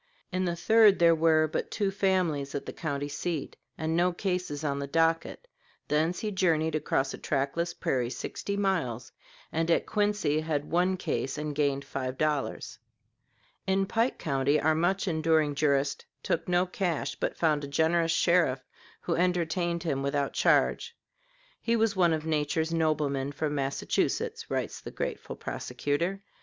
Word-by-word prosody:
In 185 +1 0
the 170 -1 -1
third 215 +3 +5
there 170 -1 +6
were 160 -1 +3
but 155 - -3
two 200 -3 -1
families 180 -8 0
at 140 - -3
the - - -6
county 145 -3 -3
seat, 150 +1 -4 0.2
and 160 +1 -1
no 175 +2 +3
cases 180 -5 -3
on 140 -2 -1
the 140 - -3
docket. 165 - 0 0.4
Thence 160 +4 +1
he 215 - -2
journeyed 160 -5 +1
across 140 -3 0
a - - -8
trackless 155 +5 -1
prairie 125 -2 -1
sixty 200 +9 -4
miles, 165 - -1 0.4
and 165 +1 -1
at 170 - +3
Quincy 205 -8 +1
had 155 -2 -2
one 180 +2 +2
case 135 -5 -2
and 150 0 -3
gained 140 -1 0
five 130 -1 -4
dollars. 150 -3 -2 0.9
In 190 0 +2
Pike 230 +5 0
County 140 0 +1
our 155 +1 +3
much 185 +5 +1
enduring 160 -3 +2
jurist 140 -1 +1 0.2
took - - -1
no 175 +1 +3
cash, 175 -6 -2
but - - -3
found 155 -3 +1
a - - -4
generous 165 +3 +2
sheriff 165 -7 +2 0.4
who 170 - -1
entertained 170 -1 0
him 140 -5 -1
without 140 0 -1
charge. 470 0 +2 0.6
"He 235 - +1
was 225 -2 +2
one 175 -3 +4
of 160 -1 -1
nature's 160 +1 0
noblemen, 145 -4 0
from 150 +1 -2
Massachusetts," 135 -1 -1
writes - - -3
the - - -7
grateful - - -5
prosecutor. 145 - -3
160 Hz, 155 wpm, -28 LUFS, 145-180 Hz, 0.9 s, there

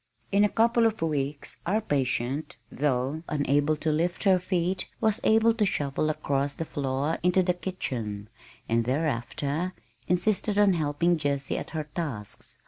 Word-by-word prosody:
In 200 +1 +4
a 210 - +4
couple 230 +1 +3
of 220 -6 -2
weeks 145 -2 -2
our 205 +5 +1
patient, 135 - -1
though 135 +2 0
unable 145 +1 +2
to 155 +1 0
lift 170 +4 0
her 190 -3 +5
feet, 180 0 -1
was 220 -2 +1
able 225 +1 +5
to 225 - 0
shuffle 150 -5 0
across 140 -2 -1
the 165 - -3
floor 140 +2 -1
into 180 +1 +3
the 180 0 +2
kitchen, 115 - -4 0.4
and 115 0 +1
thereafter 145 +5 -1 0.3
insisted 200 +3 +1
on 205 -2 +5
helping 165 +2 +1
Jessie 140 -2 -1
at - - -7
her 160 -1 -3
tasks. 145 - -6
155 Hz, 150 wpm, -27 LUFS, 140-185 Hz, 0.4 s, her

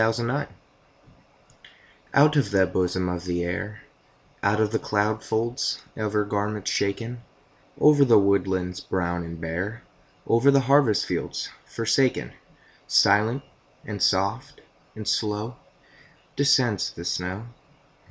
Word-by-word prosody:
SNOW 110 +1 +3
FLAKES 125 +5 -2 1.6
Out 150 +2 +6
of 140 -8 +2
the 95 -2 +3
bosom 90 0 -1
of 90 0 -4
the 85 -1 -1
Air, 105 +5 -4 0.6
Out 100 +2 +2
of 110 -1 +1
the 110 - 0
cloud 105 +1 -1
folds 115 +3 -2
of 110 -1 -3
her 105 -1 +1
garments 105 0 -2
shaken, 115 +4 -2 0.6
Over 150 -1 +6
the 125 -4 +6
woodlands 95 -2 +1
brown 90 -1 -2
and 85 0 -8
bare, 90 +8 -4 0.4
Over 115 +5 +4
the 140 -1 +5
harvest 135 -4 +3
fields - - -3 0.2
forsaken, 120 +3 0 0.5
Silent, 115 +7 +3 0.4
and 105 -3 -6
soft, 100 +7 0 0.3
and 110 -1 -7
slow 110 +3 -1 0.8
Descends 130 -8 +2
the 85 - -9
snow. 90 +5 -3
105 Hz, 125 wpm, -25 LUFS, 95-120 Hz, 1.6 s, Out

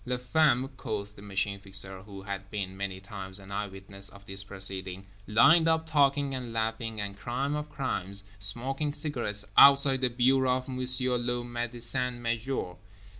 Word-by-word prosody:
Les 125 0 -2
femmes, 130 0 +2
quoth 105 -2 -5
the 100 - -13
Machine 100 0 -2
Fixer, 95 -1 -2
who 100 -1 -10
had 100 0 -6
been 100 -3 -4
many 95 -1 -4
times 95 -1 -5
an 95 0 -12
eye 105 +1 -2
witness 95 0 -7
of 100 0 -15
this 95 0 -1
proceeding, 95 -1 -2 0.2
lined 160 +10 +6
up 160 0 +2
talking 140 -2 +2
and 125 -3 -5
laughing 115 0 -2
and—crime 120 +8 -3
of 150 0 -4
crimes—smoking 105 - -1
cigarettes, 120 -10 -2
outside 140 -1 +7
the 130 - +2
bureau 130 +1 +3
of 130 - -7
M. 130 -1 -5
le - - -1 0.6
Médecin 120 +1 -1
Major. 115 -5 -3
110 Hz, 155 wpm, -29 LUFS, 100-130 Hz, 0.6 s, outside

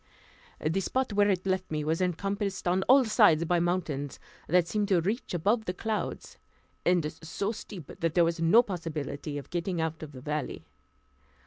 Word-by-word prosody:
The 160 +5 0
spot 255 +4 -1
where 205 0 +4
it 185 -2 0
left 185 -1 -1
me 155 -1 -2
was 160 +3 0
encompassed 195 +2 -1
on 180 +2 +2
all 265 0 +7
sides 205 -8 +5
by 175 +1 +2
mountains, 165 -6 -2 0.3
that 175 +1 +3
seemed 210 +2 0
to 190 -4 +3
reach 200 +3 -2
above 210 +7 +1
the 180 - -3
clouds, 220 +2 -4 0.4
and 170 -4 +2
so 195 +6 -2
steep 205 -6 -8
that 165 -2 -1
there 175 -1 +5
was 165 0 -1
no 170 +9 +6
possibility 155 - -4
of 140 - -8
getting 175 0 -2
out 160 -1 -2
of 155 -2 -8
the 130 - -9
valley. 150 +2 -4
175 Hz, 180 wpm, -29 LUFS, 160-200 Hz, 0.4 s, all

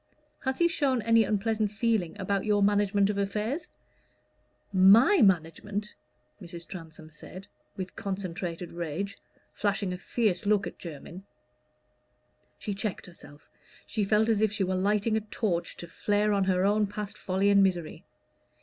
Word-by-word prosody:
"Has 265 -1 -2
he 340 - +4
shown 275 -8 0
any 230 +1 +5
unpleasant 215 0 0
feeling 215 -5 -1
about 195 0 -1
your 205 -1 +2
management 205 0 +3
of 200 - -3
affairs?" 210 - -2 1.0
"My 215 - +6
management!" 195 +2 +1 0.5
Mrs. 170 -1 -9
Transome 160 -3 -10
said, 185 +5 -11 0.3
with 185 -1 -6
concentrated 180 -3 -5
rage, 170 +4 -4 0.3
flashing 200 -2 -1
a 180 - -6
fierce 205 -2 -1
look 205 -1 +3
at - - -8
Jermyn. 170 +2 -8 1.4
She 205 - -4
checked 195 0 -4
herself: 150 -4 -15 0.4
she 215 - -2
felt 210 +2 +3
as 220 -2 +2
if 220 -2 +3
she 210 -2 -1
were 185 0 -1
lighting 210 +3 +1
a - - -1
torch 205 -4 -2
to 170 - -8
flare 205 +4 0
on 200 -1 +2
her 185 0 +2
own 210 +1 +2
past 205 0 -6
folly 190 +2 0
and 200 0 +6
misery. 175 -5 0
200 Hz, 150 wpm, -28 LUFS, 185-210 Hz, 1.4 s, My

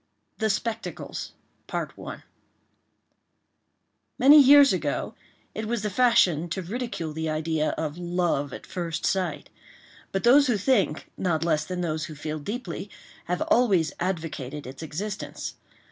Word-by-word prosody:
THE 220 -1 +1
SPECTACLES 225 +2 -4 2.8
Many 290 +4 +8
years 285 +1 +8
ago, - - -2 0.4
it 220 0 -4
was 230 -1 -2
the 210 - -1
fashion 185 -8 +3
to 185 +3 -3
ridicule 195 -5 -4
the 160 +1 -2
idea 155 0 0
of 160 +1 -3
"love 175 -5 0
at - - -8
first 170 -3 -4
sight;" 180 -6 -1 0.6
but 195 - -2
those 275 +4 +6
who 240 -4 +2
think, 200 - +1
not 165 -3 0
less 155 -3 +1
than 180 -1 -4
those 155 -2 -2
who 155 - -9
feel 155 +1 -4
deeply, 200 - -5 0.4
have 180 +1 -1
always 200 -10 +3
advocated 160 -6 -3
its 130 +4 -9
existence. 195 +6 -5
180 Hz, 130 wpm, -26 LUFS, 160-220 Hz, 2.8 s, Many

